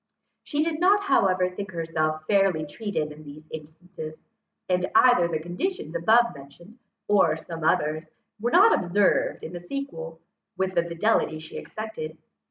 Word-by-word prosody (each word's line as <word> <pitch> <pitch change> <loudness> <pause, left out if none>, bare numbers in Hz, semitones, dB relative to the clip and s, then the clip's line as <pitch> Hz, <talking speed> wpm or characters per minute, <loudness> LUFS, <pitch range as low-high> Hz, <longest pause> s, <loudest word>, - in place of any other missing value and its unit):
She 295 +1 -1
did 320 -1 -2
not 400 +3 +4
however 185 - +3
think 190 +1 -7
herself 155 -2 -2
fairly 195 -6 +2
treated 155 -2 -3
in 150 +1 -12
these 150 +1 -12
instances, 160 +1 -9 0.5
and 180 0 +1
either 245 -9 +6
the 165 -2 -1
conditions 175 - -4
abovementioned, 175 - 0 0.3
or 170 -7 +4
some 165 0 -8
others, 155 0 +1 0.3
were 235 +3 0
not 395 - +6
observed 190 +3 +1
in - - -7
the 175 - -5
sequel, 170 -7 -6 0.4
with 190 0 -1
the 170 - +3
fidelity 170 -1 +1
she 155 0 -11
expected. 215 -8 -7
175 Hz, 145 wpm, -25 LUFS, 155-215 Hz, 0.5 s, either